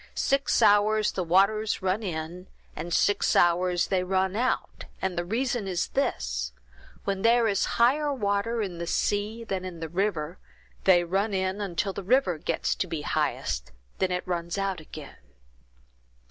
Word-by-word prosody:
Six 275 Hz, 0 st, +2 dB
hours 210 Hz, +1 st, +4 dB
the 185 Hz, -, -2 dB
waters 200 Hz, +4 st, +2 dB
run 190 Hz, +3 st, +1 dB
in, 175 Hz, -1 st, -5 dB, 0.3 s
and 175 Hz, -, -6 dB
six 205 Hz, +4 st, +2 dB
hours 175 Hz, +1 st, +3 dB
they 185 Hz, -2 st, +1 dB
run 190 Hz, +1 st, 0 dB
out, 250 Hz, +4 st, -1 dB
and 190 Hz, -1 st, -2 dB
the 175 Hz, -, -1 dB
reason 235 Hz, +2 st, -1 dB
is 180 Hz, -2 st, -1 dB
this: -, -, -1 dB, 0.5 s
when 195 Hz, -1 st, -2 dB
there 230 Hz, +1 st, +4 dB
is 200 Hz, -2 st, +1 dB
higher 285 Hz, +5 st, +3 dB
water 220 Hz, -1 st, 0 dB
in 180 Hz, -4 st, -5 dB
the 170 Hz, -, -4 dB
sea 210 Hz, +5 st, -1 dB
than 195 Hz, -4 st, -3 dB
in 180 Hz, -3 st, -7 dB
the 160 Hz, -1 st, -5 dB
river, 175 Hz, -2 st, -2 dB, 0.5 s
they 175 Hz, -2 st, +6 dB
run 195 Hz, +4 st, 0 dB
in 190 Hz, +2 st, -1 dB
until 195 Hz, 0 st, -2 dB
the 200 Hz, -, -5 dB
river 195 Hz, -, +2 dB
gets -, -, -1 dB
to -, -, -1 dB
be -, -, -4 dB
highest, -, -, -1 dB
and -, -, -25 dB, 0.3 s
then 190 Hz, -1 st, +1 dB
it 180 Hz, 0 st, -2 dB
runs 170 Hz, 0 st, -2 dB
out 195 Hz, -2 st, -1 dB
again." 155 Hz, -2 st, -11 dB
190 Hz, 165 wpm, -27 LUFS, 175-215 Hz, 0.5 s, they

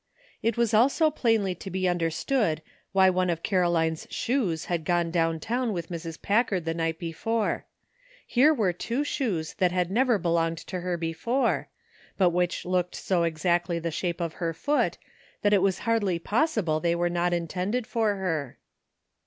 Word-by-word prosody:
It 230 Hz, 0 st, 0 dB
was 235 Hz, -2 st, +1 dB
also 280 Hz, +8 st, +4 dB
plainly 225 Hz, -9 st, +1 dB
to 185 Hz, +2 st, -8 dB
be 185 Hz, 0 st, -1 dB
understood 170 Hz, -, 0 dB, 0.3 s
why 190 Hz, -1 st, +5 dB
one 185 Hz, 0 st, +1 dB
of 165 Hz, -1 st, -2 dB
Caroline's 170 Hz, -4 st, +1 dB
shoes 210 Hz, -, -1 dB
had 170 Hz, -2 st, -2 dB
gone 170 Hz, 0 st, +1 dB
down 165 Hz, -1 st, +1 dB
town 240 Hz, +5 st, -1 dB
with 170 Hz, -3 st, -4 dB
Mrs. 165 Hz, -1 st, -6 dB
Packard 205 Hz, -5 st, +1 dB
the 165 Hz, -, 0 dB
night 165 Hz, -1 st, -1 dB
before; 210 Hz, +7 st, -2 dB, 0.6 s
here 270 Hz, +5 st, +4 dB
were 215 Hz, -, +1 dB
two 235 Hz, +10 st, -2 dB
shoes 205 Hz, -, -2 dB
that 180 Hz, -2 st, +3 dB
had 180 Hz, 0 st, 0 dB
never 245 Hz, +1 st, +3 dB
belonged 165 Hz, -2 st, 0 dB
to 180 Hz, +2 st, -6 dB
her 180 Hz, 0 st, -2 dB
before, 165 Hz, +11 st, 0 dB, 0.5 s
but 185 Hz, -3 st, +4 dB
which 175 Hz, 0 st, -1 dB
looked 180 Hz, 0 st, 0 dB
s<5 175 Hz, -3 st, +1 dB
exactly 170 Hz, +2 st, 0 dB
the 170 Hz, 0 st, -3 dB
shape 170 Hz, +2 st, -2 dB
of 165 Hz, -2 st, -2 dB
her 165 Hz, -1 st, -1 dB
foot 295 Hz, -, 0 dB, 0.5 s
that 205 Hz, 0 st, +4 dB
it 200 Hz, -, +5 dB
was 190 Hz, -1 st, +2 dB
hardly 215 Hz, -6 st, +1 dB
possible 205 Hz, -, +1 dB
they 170 Hz, +1 st, +1 dB
were 175 Hz, 0 st, +1 dB
not 175 Hz, 0 st, 0 dB
intended 180 Hz, +7 st, -1 dB
for 225 Hz, -4 st, 0 dB
her. 160 Hz, -9 st, -3 dB
180 Hz, 170 wpm, -27 LUFS, 170-220 Hz, 0.6 s, why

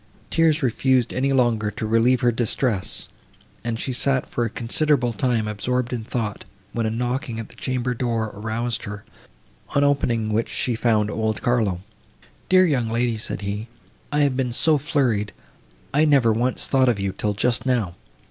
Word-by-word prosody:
Tears 160 Hz, -2 st, +3 dB
refused 130 Hz, 0 st, +2 dB
any 135 Hz, +2 st, 0 dB
longer 120 Hz, -5 st, +2 dB
to 110 Hz, -, -5 dB
relieve 115 Hz, +3 st, +3 dB
her 120 Hz, -, +4 dB
distress, 115 Hz, -3 st, 0 dB, 0.6 s
and 115 Hz, -1 st, -3 dB
she 130 Hz, -, -2 dB
had 125 Hz, -, +1 dB
sat 135 Hz, -1 st, +2 dB
for 120 Hz, -, -2 dB
a 115 Hz, -, -1 dB
considerable 125 Hz, +2 st, +1 dB
time 115 Hz, -1 st, 0 dB
absorbed 125 Hz, +4 st, -2 dB
in 115 Hz, -3 st, -3 dB
thought, 110 Hz, -2 st, -3 dB, 0.3 s
when 115 Hz, -1 st, 0 dB
a -, -, 0 dB
knocking 120 Hz, +1 st, -2 dB
at 115 Hz, -, -7 dB
the -, -, -15 dB
chamber 125 Hz, -1 st, -2 dB
door 115 Hz, -3 st, -1 dB
aroused 115 Hz, +3 st, -3 dB
her, 105 Hz, 0 st, -7 dB, 0.7 s
on 140 Hz, -, +4 dB
opening 120 Hz, -6 st, +1 dB
which 115 Hz, +2 st, 0 dB
she 125 Hz, -, -1 dB
found 110 Hz, -2 st, +1 dB
old 110 Hz, -1 st, -2 dB
Carlo. 110 Hz, -7 st, +1 dB, 0.7 s
"Dear 185 Hz, 0 st, +6 dB
young 130 Hz, -9 st, +1 dB
lady," 115 Hz, 0 st, 0 dB
said 105 Hz, -, -3 dB
he, 105 Hz, +2 st, -4 dB, 0.4 s
"I 150 Hz, 0 st, +2 dB
have 140 Hz, -3 st, +2 dB
been 125 Hz, -2 st, -1 dB
so 155 Hz, +4 st, +3 dB
flurried, 125 Hz, -8 st, 0 dB, 0.6 s
I 150 Hz, +3 st, +4 dB
never 135 Hz, -7 st, +4 dB
once 120 Hz, +3 st, 0 dB
thought 130 Hz, -2 st, +3 dB
of 115 Hz, -4 st, 0 dB
you 100 Hz, 0 st, -1 dB
till 105 Hz, 0 st, -1 dB
just 125 Hz, +5 st, 0 dB
now. 115 Hz, -9 st, +1 dB
120 Hz, 175 wpm, -23 LUFS, 110-130 Hz, 0.7 s, Dear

